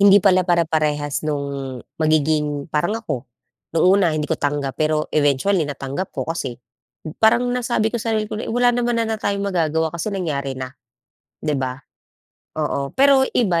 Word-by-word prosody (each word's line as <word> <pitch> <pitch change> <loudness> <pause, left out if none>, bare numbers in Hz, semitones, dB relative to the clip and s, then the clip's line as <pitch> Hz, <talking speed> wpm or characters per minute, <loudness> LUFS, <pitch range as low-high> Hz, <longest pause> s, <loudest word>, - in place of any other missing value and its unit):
Hindi 200 0 +8
pala 185 -2 +4
pare-parehas 155 -4 +1
no'ng 140 -3 -3 0.2
magiging 150 -1 +1
parang 175 +9 +1
ako, 135 - -5 0.5
no'ng 160 - +4
una 190 0 +5
hindi 150 - -1
ko - - -2
tanggap 145 -1 -2
pero 155 0 0
eventually 150 +3 +2
natanggap 140 +6 -4
ko - - -4
kasi, 140 -7 -4 0.6
parang 225 +2 +5
nasabi 235 -3 0
ko 235 - -2
sa 225 0 0
sarili 215 - 0
ko 215 +1 -5
na, - - -5
“Wala 245 +1 +3
naman 240 -1 0
na 230 - +1
na 220 - -4
tayong 200 0 -1
magagawa 160 -4 0
kasi 170 +5 -3
nangyari 145 -9 -2
na.” 130 0 -6 0.7
‘Di 150 - -2
ba? 130 -1 -2 0.8
Oo. 140 -2 -1
Pero 275 0 +6 0.2
iba, 180 -8 +2
160 Hz, 170 wpm, -21 LUFS, 145-205 Hz, 0.8 s, Hindi